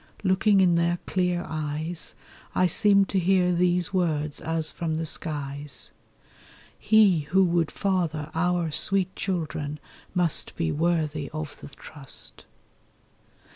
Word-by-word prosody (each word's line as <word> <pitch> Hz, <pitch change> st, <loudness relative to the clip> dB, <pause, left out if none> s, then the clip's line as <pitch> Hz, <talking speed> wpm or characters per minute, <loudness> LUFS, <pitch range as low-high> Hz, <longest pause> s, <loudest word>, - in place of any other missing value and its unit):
Looking 195 Hz, +1 st, +3 dB
in 180 Hz, -2 st, +4 dB
their 170 Hz, +1 st, +2 dB
clear 180 Hz, -1 st, 0 dB
eyes, 155 Hz, +2 st, -5 dB, 0.4 s
I 185 Hz, -, +3 dB
seemed 200 Hz, 0 st, +4 dB
to 195 Hz, -, +1 dB
hear 180 Hz, 0 st, +3 dB
these 180 Hz, +1 st, +1 dB
words 155 Hz, -5 st, -1 dB
as 160 Hz, 0 st, -1 dB
from 160 Hz, -2 st, -3 dB
the 165 Hz, +1 st, -2 dB
skies: 145 Hz, -4 st, -4 dB, 0.9 s
'He 210 Hz, -5 st, +5 dB
who 190 Hz, +1 st, +4 dB
would 170 Hz, -2 st, +1 dB
father 165 Hz, -6 st, -2 dB
our 175 Hz, -1 st, 0 dB
sweet 190 Hz, +4 st, +2 dB
children 155 Hz, -5 st, -3 dB, 0.4 s
must 175 Hz, -4 st, 0 dB
Be 80 Hz, -, -1 dB
worthy 155 Hz, -3 st, -1 dB
of 155 Hz, -1 st, -6 dB
the -, -, -8 dB
trust. 140 Hz, -1 st, -5 dB
170 Hz, 125 wpm, -26 LUFS, 155-185 Hz, 0.9 s, He